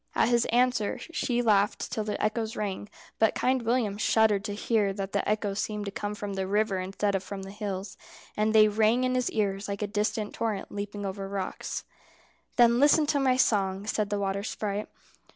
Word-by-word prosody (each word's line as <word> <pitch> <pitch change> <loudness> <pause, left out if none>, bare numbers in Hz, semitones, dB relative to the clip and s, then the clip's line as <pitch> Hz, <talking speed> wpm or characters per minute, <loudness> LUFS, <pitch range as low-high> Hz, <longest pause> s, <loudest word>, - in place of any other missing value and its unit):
At - - +3
his 240 -1 +3
answer 245 -3 +1
she 245 -7 -2
laughed 205 -2 +2
till 215 - -1
the 210 0 -3
echoes 220 +1 -1
rang, 205 -1 -4 0.3
but 220 - +3
Kind 260 0 +1
William 225 -3 0
shuddered 215 -2 +3
to 205 - -3
hear 210 -2 +1
that 195 0 -4
the 200 - -1
echoes 210 -1 -1
seemed 210 -1 -2
to 200 - -4
come 205 +1 -4
from 205 -1 -5
the 190 -1 -2
river 205 -1 +1
instead 195 +2 -1
of 195 - 0
from 195 0 -6
the 195 - -8
hills; 200 -2 -5 0.4
and 215 +1 +1
they 215 -1 +7
rang 220 +4 +2
in 255 0 +1
his 250 -1 +1
ears 200 -2 -1
like 200 +1 -3
a - - +1
distant 210 +1 -2
torrent 220 -3 -3
leaping 205 0 -5
over 195 0 -4
rocks. 195 -1 -4 0.7
"Then 240 0 +5
listen 295 +2 +5
to 290 -1 +1
my 260 -2 +3
song," 195 -5 +1
said 215 -1 -1
the 205 - -1
water 195 0 -1
sprite. 205 0 -3
210 Hz, 200 wpm, -28 LUFS, 200-225 Hz, 0.7 s, they